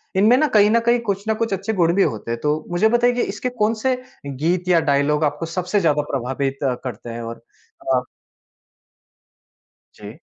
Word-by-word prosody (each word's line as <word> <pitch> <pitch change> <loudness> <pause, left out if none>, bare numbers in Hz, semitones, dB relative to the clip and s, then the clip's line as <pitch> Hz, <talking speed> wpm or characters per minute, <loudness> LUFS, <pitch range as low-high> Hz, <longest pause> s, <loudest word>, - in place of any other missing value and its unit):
इनमें 215 +6 +5
ना 305 - +3
कहीं 210 0 +6
न 230 - +4
कहीं, 240 0 +3
कुछ 200 -3 -3
न - - +3
कुछ 225 -3 0
अच्छे 220 +4 -2
गुण 170 -3 +2
भी 200 - +4
होते 110 +1 -3
हैं। 115 - -3
तो 150 +1 0
मुझे 185 +5 +3
बताइए 240 +1 +3
कि 245 - -1
इसके 235 +5 -3
कौन-से 225 +4 +1 0.3
गीत 165 +7 -1
या 175 -2 +4
डायलॉग 145 +2 +2
आपको 150 +2 -1
सबसे 180 +4 -1
ज़्यादा 150 -5 +2
प्रभावित 135 +1 -2 0.3
करते 120 -1 -7
हैं? 115 0 -6
और 115 0 -7 0.5
अ 125 - +3 1.9
जी। - - -11
175 Hz, 180 wpm, -21 LUFS, 140-215 Hz, 1.9 s, कहीं